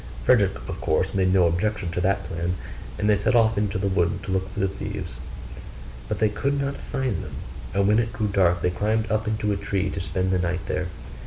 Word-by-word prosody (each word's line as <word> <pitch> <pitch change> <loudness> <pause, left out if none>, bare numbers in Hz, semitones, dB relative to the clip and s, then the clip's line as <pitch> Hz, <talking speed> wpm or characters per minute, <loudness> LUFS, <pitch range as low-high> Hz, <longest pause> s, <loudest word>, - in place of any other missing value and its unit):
Frederick - - +4
of - - -5
course 80 +4 +1
made 95 -2 +2
no 95 -2 +5
objection 90 +2 0
to 90 - -1
that 95 +1 +1
plan, 85 +2 -2 0.4
and 105 - 0
they 105 - +5
set 100 +4 +1
off 115 -1 +5
into 100 -2 0
the 100 +1 0
wood 90 -1 +1
to 95 - -4
look 95 0 0
for - - -6
the 95 - +3
thieves; 95 - -5 1.0
but 105 - -2
they 110 - +3
could 140 +7 -1
not 140 0 -1
find 130 -8 -2
them: - - -8 0.4
and 100 0 +3
when 105 +2 +5
it 115 -1 0
grew 110 - -2
dark, 90 -4 +2
they 90 - +2
climbed 110 +4 0
up 110 0 0
into 105 -1 0
a - - +1
tree 100 -1 -1
to 95 - -3
spend 95 +1 -1
the 95 - +2
night 90 0 -1
there. - - -1
100 Hz, 230 wpm, -25 LUFS, 90-105 Hz, 1.0 s, no